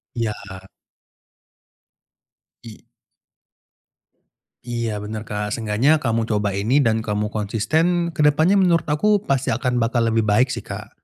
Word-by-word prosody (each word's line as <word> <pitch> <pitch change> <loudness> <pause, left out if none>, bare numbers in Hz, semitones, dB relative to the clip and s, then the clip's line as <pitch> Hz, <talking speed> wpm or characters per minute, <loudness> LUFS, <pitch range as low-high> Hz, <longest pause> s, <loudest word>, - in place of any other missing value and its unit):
Iya. 100 -5 -5 2.0
I 110 -2 -11 1.9
Iya, 115 -3 -3
benar, 105 +1 -6
Kak, 105 -1 -4
seenggaknya 120 +8 +1
kamu 115 -2 0
coba 105 -2 0
ini, 110 +9 +1
dan 110 -3 +2
kamu 105 -1 -2
konsisten. 155 - 0
Ke 150 -2 +1
depannya 160 +7 +3
menurut 175 -3 +3
aku 205 +7 +2
pasti 135 - 0
akan 125 +1 -1
bakal 115 0 +1
lebih 110 -1 +1
baik 115 +5 +3
sih, - - -5
Kak. - - -7
115 Hz, 125 wpm, -21 LUFS, 105-145 Hz, 2.0 s, depannya